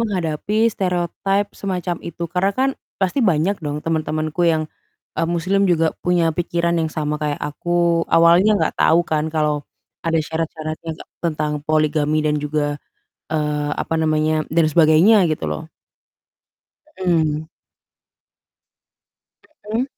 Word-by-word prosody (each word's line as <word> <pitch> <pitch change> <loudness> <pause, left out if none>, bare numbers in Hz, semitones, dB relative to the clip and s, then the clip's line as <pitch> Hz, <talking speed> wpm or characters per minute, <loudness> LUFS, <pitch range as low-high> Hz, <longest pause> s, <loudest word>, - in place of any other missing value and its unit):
menghadapi 205 +1 0
stereotipe 195 +2 -1
semacam 180 -3 -3
itu, 170 0 -6
karena, 180 +4 0
kan, 265 +1 +2 0.3
pasti 190 +8 0
banyak 185 0 +1
dong 150 0 -4
teman-temanku 155 0 -1
yang, 160 -1 +1 0.5
eee, 165 - -1
muslim 185 +4 +1
juga 165 -2 +2
punya 175 -2 +2
pikiran 170 0 0
yang 160 - -1
sama 150 -1 -2
kayak 150 -1 -1
aku. 170 +2 0
Awalnya 175 +6 +5
enggak - - 0
tahu 165 +2 +5
kan 155 0 0
kalau, 150 -2 0 0.4
ada 165 0 -2
syarat-syaratnya 160 0 -4
enggak - - -14
tentang 155 -3 -1
poligami 155 0 +1
dan 150 -1 +1
juga, 145 0 -2 0.5
eee, 150 -1 -1
apa 165 - -2
namanya, 155 0 +1
dan 160 -1 +3
sebagainya, 165 +7 +5
gitu, 155 -1 -2
loh. 160 0 -5 1.3
Mhm. 160 -3 +1 2.3
Mhm. 235 +3 +1
160 Hz, 125 wpm, -20 LUFS, 155-175 Hz, 2.3 s, Awalnya